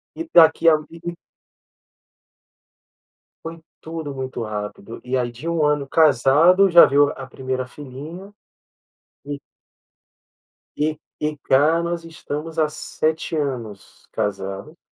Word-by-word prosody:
E 330 0 -6
daqui 165 0 +6
ali 165 +2 0 2.3
Foi 165 +1 -7 0.2
tudo 160 -3 -6
muito 130 -2 -5
rápido, 105 +1 -6
e 130 +1 -2
aí 120 -1 -1
de 135 +8 -7
um 165 -2 +1
ano 145 -2 +1
casado, 160 +6 +5
já 170 0 +9
veio 145 +1 +4
a 135 - -8
primeira 130 0 -4
filhinha 150 +9 -10 0.9
e 145 0 -5 1.4
e 155 +1 0 0.2
e 150 0 -2
cá 150 +5 +2
nós 170 0 -3
estamos 160 -1 -7
há 155 -1 +3
7 155 +1 -2
anos 120 -9 -5
casado. 100 - -4
150 Hz, 115 wpm, -21 LUFS, 130-165 Hz, 2.3 s, já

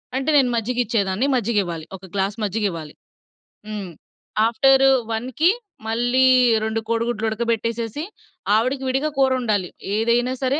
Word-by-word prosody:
అంటే, 270 +3 -1
నేను 260 -3 +4
మజ్జిగిచ్చేదాన్ని. 230 -2 0
మజ్జిగివ్వాలి. 200 -9 -1
ఒక 190 0 -12
గ్లాస్ 195 +1 -1
మజ్జిగివ్వాలి. 190 -7 -2 0.7
హ్మ్ 205 -4 -5 0.6
ఆఫ్టరు 270 +3 +4 0.2
1కి 255 +9 +1 0.4
మళ్ళీ 245 +3 +2 0.4
2 220 0 -1
కోడిగుడ్లుడకబెట్టేసేసి, 230 +2 -1 0.5
ఆవిడకి 255 +5 0
విడిగా 270 +4 0
కూరొండాలి. 240 -8 +1 0.3
ఏదైనా 235 +3 +1
సరే 265 +3 +1
230 Hz, 100 wpm, -22 LUFS, 210-255 Hz, 0.7 s, నేను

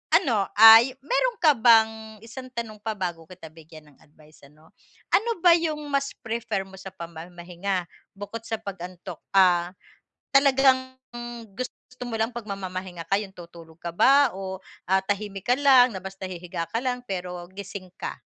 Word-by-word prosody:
ano 225 - +2
ay 225 +4 +9
meron - - 0
ka 310 - +8
bang, 220 -2 +3
isang 255 +3 -9
tanong 225 -3 -6
pa 220 0 -4
bago 175 -4 -5
kita 170 -3 -12
bigyan 155 -1 -15
ng 140 - -26
advice 155 0 -22
ano, 155 +3 -23 0.4
ano 455 +3 +3
ba 350 - +8
yung 315 -2 -2
mas 275 0 -1
prefer 225 -3 -3
mo 190 0 -14
sa 190 - -10
pamamahinga, 175 +2 -5 0.3
bukod 205 +3 -7
sa 225 - -1
pag-antok. 180 -4 -8 0.2
Ah, 180 -2 +4 0.6
talagang 260 -1 +3 0.6
gusto 255 0 -8
mo 230 - -4
lang 225 +2 -1
pagmamamahinga 185 -5 -6
ka 195 - +2
yung 195 -2 -9
tutulog 170 -2 -14
ka 170 - -5
ba 275 +4 +5
o 190 -1 -6 0.3
ah 190 - +5
tahimik 200 -1 -4
ka 245 - +4
lang 260 -5 +5
na 190 - -7
basta 190 0 -7
hihiga 175 -2 -6
ka 225 - -2
lang 250 -1 -1
pero 180 -2 -5
gising 195 -1 -8
ka? - - -5
195 Hz, 160 wpm, -25 LUFS, 180-240 Hz, 0.6 s, ay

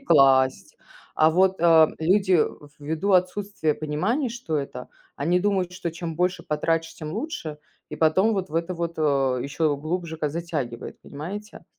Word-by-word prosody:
класть. 135 - +3 0.4
А 155 +1 +5
вот, 190 +3 +3
э, 165 -2 +6
люди, 185 +1 +3 0.4
ввиду 160 +7 -1
отсутствия 185 -3 +1
понимания, 195 - -1
что 235 -10 -3
это, 125 -3 -6 0.3
они 175 +5 +1
думают, 195 -3 0
что 180 -2 -4
чем 165 -1 -5
больше 180 +1 0
потратишь, 165 +2 -1
тем 155 0 -7
лучше, 165 - -5 0.3
и 150 - -5
потом 175 +8 +3
вот 195 -3 -2
в - - -10
это 170 +2 -1
вот, 170 0 -3
э, 135 -4 +2
еще 145 +1 0
глубже 160 +2 -4
как 150 -2 -2
затягивает, 150 -7 -4
понимаете? 200 +9 -8
165 Hz, 155 wpm, -24 LUFS, 150-185 Hz, 0.4 s, э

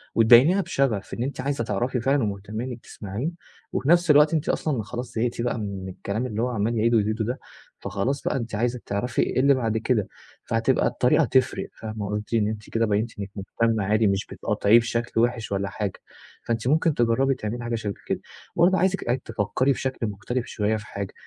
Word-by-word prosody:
وتبينيها 125 - +7
بشغف 135 - -1
إن 120 - -2
أنتِ 135 0 -3
عايزة 140 -2 -1
تعرفي 120 +4 -1
فعلًا 135 +1 +2
ومُهتمية 105 +3 -4
إنك 125 -2 -6
تسمعيه، 105 +9 -4 0.4
وفي 135 - -1
نفس 175 -1 +5
الوقت 150 +2 +6
أنتِ 160 -1 0
أصلًا 135 -8 0
خلاص 120 +3 -6
زهقتِ 120 +1 -1
بقى 120 0 -1
من 100 -3 -5
الكلام 100 +5 -3
اللي 110 -3 -3
هو 125 - +1
عمّال 115 0 -1
يعيده 115 +2 +3
ويزيده 110 +1 0
ده، 125 +4 -3 0.4
فخلاص 135 +3 -2
بقى - - 0
أنتِ 115 -3 -4
عايزة 120 +3 0
تعرفي 110 +5 -1
إيه - - 0
اللي 140 +2 +5
بعد 115 -4 0
كده، 110 -2 0 0.4
فهتبقى - - +2
الطريقة - - +3
تفرق - - +1
فاهمة 110 -1 -5
قولتِ 105 +2 -4
إن 110 -2 +3
أنتِ 105 -1 -5
كده 115 0 +1
بينتِ 105 +1 -1
إنك 100 -1 -4
مهتمة 110 +2 0
عادي 105 +2 +2
مش 100 0 0
بتقاطعيه 110 +3 +3
بشكل 115 0 -2
وحِش 120 -2 0
ولا 100 0 -1
حاجة، 100 -3 -4 0.5
فأنتِ 115 0 -1
ممكن 155 +3 +3
تجربي 125 +2 +2
تعملي 120 0 -4
حاجة 120 0 -2
شبه 105 -3 -3
كده، - - -1 0.4
وبرضه 180 +3 +4
عايزِك 190 +1 +1 0.2
تفكّري 115 +4 0
بشكل 130 -3 -2
مختلف 105 +5 -3
شوية 105 0 -1
في 105 - -9
حاجة 100 -2 -6
115 Hz, 190 wpm, -25 LUFS, 105-130 Hz, 0.5 s, وتبينيها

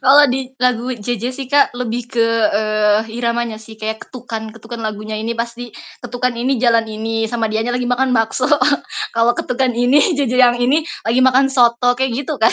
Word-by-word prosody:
Kalo 285 +2 +7
di 260 0 -3
lagu 250 0 0
JJ 230 0 -4
sih 270 -1 -6
Kak 285 +1 +3
lebih 240 0 -4
ke, 230 -2 +2 0.3
eee, 215 0 +2 0.2
iramanya 235 -1 -1
sih 220 0 -12
kayak 220 0 -5
ketukan 230 -3 -7
ketukan 230 +1 -9
lagunya 215 0 -4
ini 225 +2 -3
pasti 235 0 -5 0.3
ketukan 250 0 -2
ini 255 +3 0
jalan 230 -1 +3
ini 225 +1 -3
sama 230 -2 -1
dianya 220 +3 -1
lagi 250 0 -1
makan 255 +1 +1
bakso. 225 +4 0 0.7
Kalau 230 +1 +3
ketukan 250 0 0
ini 265 +9 +3
JJ 260 -4 0
yang 245 -1 +5
ini 265 +6 +2 0.2
lagi 240 +3 +2
makan 260 +1 +4
soto 245 0 +3
kayak 265 -2 0
gitu, 310 - -3
Kak. 225 - +4
240 Hz, 180 wpm, -17 LUFS, 225-255 Hz, 0.7 s, Kalo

